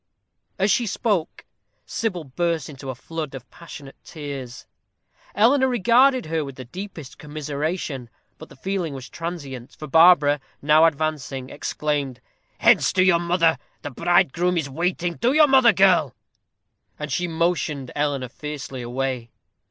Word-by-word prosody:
As 195 +2 +2
she 240 - +2
spoke, 195 -4 -1 0.4
Sybil 180 - -3
burst 165 +3 -2
into 135 -2 -9
a 130 - -4
flood 155 +2 -6
of 125 -2 -10
passionate 145 -5 -11
tears. 140 -6 -8 0.7
Eleanor 260 +5 +4
regarded 250 +3 +3
her 160 0 -1
with 135 -2 -8
the 130 - -9
deepest 175 - -9
commiseration; 150 -2 -4 0.3
but - - -11
the - - -15
feeling 180 -1 -3
was 130 -1 -8
transient; 145 -7 -7
for 155 - -7
Barbara, 150 -1 +5 0.2
now 155 +2 +5
advancing, 145 -4 -2
exclaimed: 145 -4 -3 0.4
"Hence - - +4
to 185 - +4
your 180 -2 +4
mother. 170 -1 +2 0.2
The 145 - -5
bridegroom 175 +3 +2
is 160 -4 -1
waiting: 175 +4 -2
to 245 +3 +2
your 305 0 +7
mother, 260 -4 +6
girl!" 185 - +3 0.8
And 150 -1 -6
she 180 +6 0
motioned 160 -5 -1
Eleanor 145 -3 -1
fiercely 140 -2 -7
away. 125 0 -3
155 Hz, 140 wpm, -23 LUFS, 135-180 Hz, 0.8 s, your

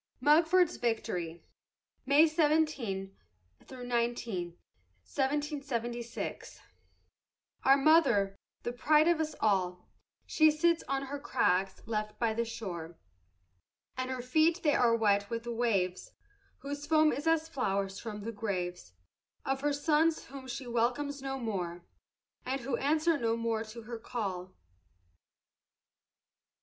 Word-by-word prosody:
MUGFORD'S 325 +5 +4
VICTORY 175 -8 -2 0.6
[May 285 +3 +7
17 295 - 0 0.5
19, 235 -8 -2 0.5
1776] 265 -5 -3 1.0
Our 270 +1 +6
mother, 270 -10 +4 0.3
the 240 - -3
pride 305 +5 +4
of 340 -2 +3
us 310 0 -3
all, 185 -4 +1 0.4
She 315 -1 +4
sits 330 +2 +2
on 275 +1 -1
her 280 +1 -5
crags 190 -8 0
by 220 +1 -1
the 235 +1 -1
shore, 175 -8 -6 1.0
And 255 0 -3
her 255 -2 -4
feet 315 +7 +2
they 295 -2 +3
are 235 -4 +4
wet 205 -2 +2
with 230 0 -3
the 240 - -4
waves 200 -6 -1 0.5
Whose 285 +1 -5
foam 310 0 +4
is 290 +3 -3
as 325 -1 +2
flowers 200 -10 -2
from 210 -2 -6
the 230 - -4
graves 180 - -4 0.5
Of 270 0 -1
her 290 +1 +1
sons 310 +2 +2
whom 270 -1 -10
she 255 +1 -5
welcomes 245 +4 -1
no 270 0 -3
more, 180 -8 -4 0.6
And 265 +1 -2
who 240 +1 -1
answer 310 +3 +2
no 230 -1 0
more 230 -1 -1
to 225 +1 -10
her 230 +1 -7
call. 190 -6 -4
240 Hz, 120 wpm, -31 LUFS, 210-290 Hz, 1.0 s, May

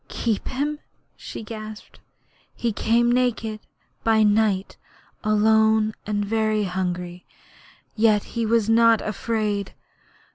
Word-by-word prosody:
'Keep 225 -4 -2
him!' 295 +3 -2 0.4
she - - -8
gasped. 215 -1 -9 0.6
'He 235 -2 -1
came 235 +3 +2
naked, 230 -3 0 0.4
by 220 -1 +4
night, 210 -2 +1 0.5
alone 220 0 +3
and 205 -1 -1
very 215 0 0
hungry; 180 -1 -3 0.7
yet 215 -2 +3
he 235 - -1
was 225 -1 +2
not 230 -1 +5
afraid! 210 -2 -2
220 Hz, 105 wpm, -23 LUFS, 210-230 Hz, 0.7 s, not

